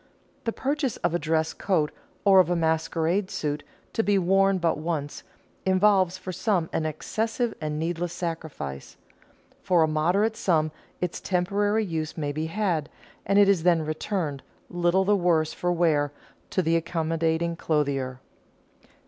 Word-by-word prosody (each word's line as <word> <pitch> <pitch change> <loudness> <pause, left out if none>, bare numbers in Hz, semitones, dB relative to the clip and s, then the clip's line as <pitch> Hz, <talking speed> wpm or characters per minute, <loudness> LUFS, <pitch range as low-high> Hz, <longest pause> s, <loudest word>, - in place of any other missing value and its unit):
The 230 - +1
purchase 275 0 -1
of 175 -1 -1
a 175 - +1
dress 160 0 0
coat 165 -7 0 0.3
or 195 -1 +7
of 185 - +4
a 175 - +2
masquerade 165 +3 0
suit 150 -1 -2 0.3
to 225 - +2
be 205 -2 +2
worn 195 +1 +3
but 170 -3 0
once, 155 -3 -3 0.4
involves 190 -1 +3
for 185 0 -6
some 185 -4 0
an 155 - 0
excessive 225 - -2
and 150 -1 -2
needless 170 +2 -2
sacrifice. 160 - -5 0.6
For 175 -3 +3
a - - +3
moderate 180 +8 +1
sum 155 -6 +1 0.3
its 180 -1 -2
temporary 205 +4 +1
use 160 -3 -4
may 145 -2 -1
be 155 +2 -3
had, 170 -5 -1 0.4
and 200 +1 +3
it 205 -1 +7
is 195 -4 +3
then 170 -2 +3
returned, 155 -2 -2 0.3
little 175 +2 +2
the 205 +1 +4
worse 170 -4 +2
for 175 - -1
wear, 155 -4 +2 0.4
to 185 - 0
the 165 +1 +2
accommodating 165 0 0
clothier. 140 -5 -1
170 Hz, 150 wpm, -26 LUFS, 155-190 Hz, 0.6 s, or